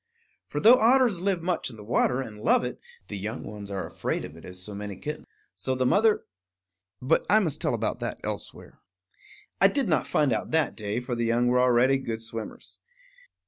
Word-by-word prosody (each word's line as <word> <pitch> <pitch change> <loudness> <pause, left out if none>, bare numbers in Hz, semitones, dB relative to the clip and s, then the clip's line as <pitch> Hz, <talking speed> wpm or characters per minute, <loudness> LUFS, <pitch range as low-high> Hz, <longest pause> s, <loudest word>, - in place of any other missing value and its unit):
For, - - -3
though 245 +3 +7
otters 235 -4 +4
live 185 -3 0
much 175 -5 -1
in 115 - -11
the 105 - -10
water 125 +3 +1
and 105 -5 -8
love 110 - +3
it, 125 - -4 0.3
the 105 - -5
young 110 +5 -4
ones 105 -1 -8
are 95 -1 -3
afraid - - -3
of 75 - -11
it 80 - -13
as 90 0 -9
so 100 +3 -8
many 100 0 -6
kittens. 150 +10 -6 0.3
So 130 - -2
the 130 0 0
mother 210 - +3 0.7
But 130 - +2
I 210 - +6
must 170 -10 0
tell - - +1
about - - -2
that - - -4
elsewhere. - - -6 0.8
I - - +9
did - - 0
not - - +1
find 145 -5 +2
out - - -2
that 155 -4 +1
day; 105 +2 -3
for 125 0 -4
the 120 -1 -1
young 120 +1 +2
were 125 +1 +3
already 125 +2 +4
good 115 -4 -4
swimmers. 115 -1 -7
125 Hz, 205 wpm, -27 LUFS, 105-155 Hz, 0.8 s, I